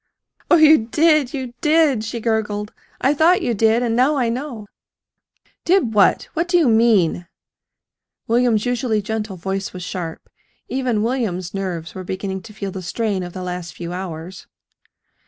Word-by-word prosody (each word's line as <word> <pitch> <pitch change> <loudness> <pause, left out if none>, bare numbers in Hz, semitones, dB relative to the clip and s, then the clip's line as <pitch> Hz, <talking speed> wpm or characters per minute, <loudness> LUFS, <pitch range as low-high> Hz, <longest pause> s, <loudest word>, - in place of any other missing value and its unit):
"Oh, - - +7
you 310 -8 +6
did, 305 0 +3
you 260 -4 -5
did!" 305 -7 +3
she 225 +1 -4
gurgled. 215 -2 -2 0.3
"I 270 - +3
thought 325 +5 +3
you 240 - 0
did, 225 +2 +2
and 230 -2 0
now 260 +5 +3
I 250 -4 +1
know!" 240 -3 -5 1.0
"Did 345 - +2
what? 205 -2 +3
What 335 +2 -1
do 355 0 +3
you 325 -5 +3
mean?" 220 -7 +3 1.0
William's 230 -2 +2
usually 245 -4 0
gentle 215 -2 -4
voice 195 +2 -4
was 180 -1 -7
sharp. 175 -3 -6 0.4
Even 250 -5 -1
William's 210 -8 -2
nerves 180 -5 -4
were 185 - -7
beginning 190 +1 -4
to 215 - -12
feel 200 -2 -5
the 190 - -6
strain 200 +1 -2
of 175 -1 -7
the 185 - -6
last 180 -1 -5
few 175 0 -6
hours. 180 0 -7
220 Hz, 160 wpm, -20 LUFS, 190-255 Hz, 1.0 s, Oh